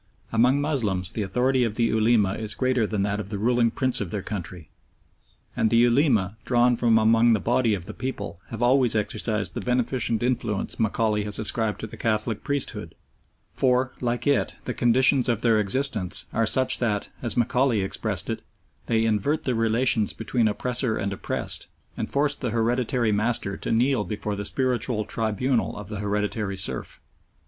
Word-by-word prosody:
Among 125 +5 +3
Moslems 110 - 0
the 110 - -3
authority 125 +6 +1
of 110 -3 -2
the 120 - +1
Ulema 110 -3 +2
is 105 0 -4
greater 130 -4 +1
than 105 -2 -1
that 100 0 -1
of 100 - -6
the 105 - -4
ruling 120 +2 +2
prince 130 +1 -1
of 100 - -3
their 100 +1 -4
country, 90 -5 -7 0.8
and 110 - +1
the 115 - +3
Ulema, 120 - +3
drawn 120 0 +3
from 115 -1 +3
among 115 +1 +4
the 110 - +2
body 115 -1 +1
of 90 -3 -8
the - - -8
people, 125 -10 -5
have 115 +1 -5
always 125 -2 +3
exercised 105 -1 -2
the - - -4
beneficent 125 -2 -1
influence 115 -5 -2
Macaulay 110 -1 0
has 105 - -1
ascribed 110 0 0
to - - -4
the 110 - -10
Catholic 110 -1 -1
priesthood, 145 -1 -3 0.6
for, 130 0 +1
like 120 -1 -2
it, 145 - +1
the 125 - -3
conditions 130 +2 +4
of 115 -4 -1
their 115 -2 +4
existence 105 -2 +1
are 115 -1 +1
such 130 +2 +4
that, 110 -4 -1
as 120 -1 -2
Macaulay 120 -1 +2
expressed 95 - -2
it, - - -3 0.5
they 115 -1 +1
"invert 115 +8 0
the 130 - 0
relations 115 -1 +1
between 115 0 0
oppressor 120 +2 -1
and 100 0 -2
oppressed, - - -3 0.3
and - - -4
force 145 +1 +1
the 125 - -3
hereditary 120 0 0
master 105 -1 -1
to - - -5
kneel 120 0 +2
before 105 0 -4
the 100 0 -5
spiritual 125 -3 -1
tribunal 115 +3 -1
of 105 -1 -8
the 105 -2 -5
hereditary 105 -1 -2
serf." 95 - -1
115 Hz, 175 wpm, -24 LUFS, 105-125 Hz, 0.8 s, among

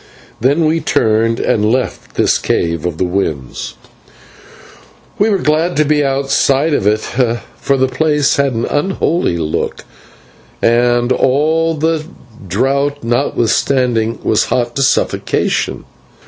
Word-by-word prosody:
Then 140 +7 +2
we 160 +2 +1
turned 115 -5 +1
and 105 0 +1
left 125 0 -3
this - - +2
cave 85 -1 -1
of 85 -3 -4
the - - 0
winds 85 -8 -3 1.4
and 215 +2 +3
were 200 - +2
glad 160 +1 0
to 155 - +3
be 150 0 +2
outside 135 +2 +1
of 105 - +1
it, 105 +1 +2 0.6
for 140 - 0
the 130 0 +2
place 150 +2 +1
had 140 -2 +1
an 115 0 -1
unholy 165 - 0
look, 80 -2 -3 0.7
and, 120 +1 +2
all 155 +6 +2
the 160 +1 0 0.4
draught 140 +8 0
notwithstanding, 115 0 0
was 110 - +2
hot 120 -1 -1
to - - 0
suffocation. 135 - 0
130 Hz, 125 wpm, -15 LUFS, 115-150 Hz, 1.4 s, and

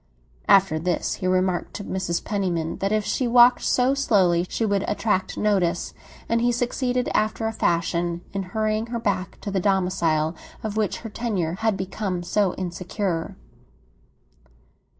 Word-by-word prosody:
After 190 -5 +5
this 175 +1 -1
he 185 - 0
remarked 185 -1 0
to 205 - -5
Mrs. 185 -3 -2
Penniman 180 -6 -1
that 195 +1 0
if 215 -1 +1
she 255 - 0
walked 240 +1 +6
so 255 +2 +2
slowly 185 -10 +2
she 225 - -1
would 200 -2 +1
attract 205 -3 -1
notice, 185 -5 +1 0.3
and 230 0 +1
he 240 +1 +3
succeeded, 245 +1 -1
after 215 +1 0
a 220 - 0
fashion, 170 -3 0
in 195 - -1
hurrying 215 +3 -1
her 235 0 -3
back 195 -4 -2
to 200 - -4
the 195 - 0
domicile 180 -5 +1 0.3
of 215 -1 -3
which 215 -4 -1
her 225 - -6
tenure 200 -9 -2
had 220 -3 +1
become 190 -1 -3
so 195 +1 +1
insecure. 180 -1 -3
195 Hz, 150 wpm, -24 LUFS, 180-220 Hz, 0.3 s, walked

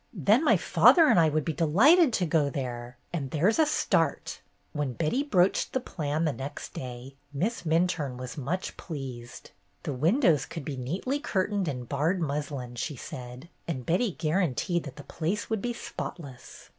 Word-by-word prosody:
Then 210 - +3
my - - +5
father 335 -3 +6
and - - +5
I 160 -1 +5
would 155 0 -1
be 160 - -1
delighted 250 - +5
to 185 - +1
go 155 -3 +2
there, 125 -3 -5 0.2
and 145 -6 -3
there 160 +9 +2
's 225 - -2
a 315 - +5
start." 300 - 0 0.3
When 145 -4 -2
Betty 165 - 0
broached 195 -10 +2
the 260 - +1
plan 155 - -2
the 155 - +1
next 135 +2 -7
day. 125 +1 -7 0.2
Miss 185 +10 -2
Minturne 160 -5 +1
was 125 0 -7
much 165 +7 -3
pleased. 130 -7 -8 0.3
The 145 - -3
win 165 - +2
dows 155 - +3
could 165 -5 -7
be 145 - -4
neatly 180 - -2
curtained 200 - -1
in 125 -4 -3
barred 150 +9 0
muslin, 145 -5 -3
she 145 +5 -3
said, 125 +3 -8 0.2
and 130 -7 -4
Betty 185 +4 +1
guaranteed 170 0 0
that 135 -3 -8
the 145 - -10
place 190 +10 -3
would 220 -3 0
be 240 - -1
spotless. 145 - -8
155 Hz, 180 wpm, -28 LUFS, 135-185 Hz, 0.3 s, father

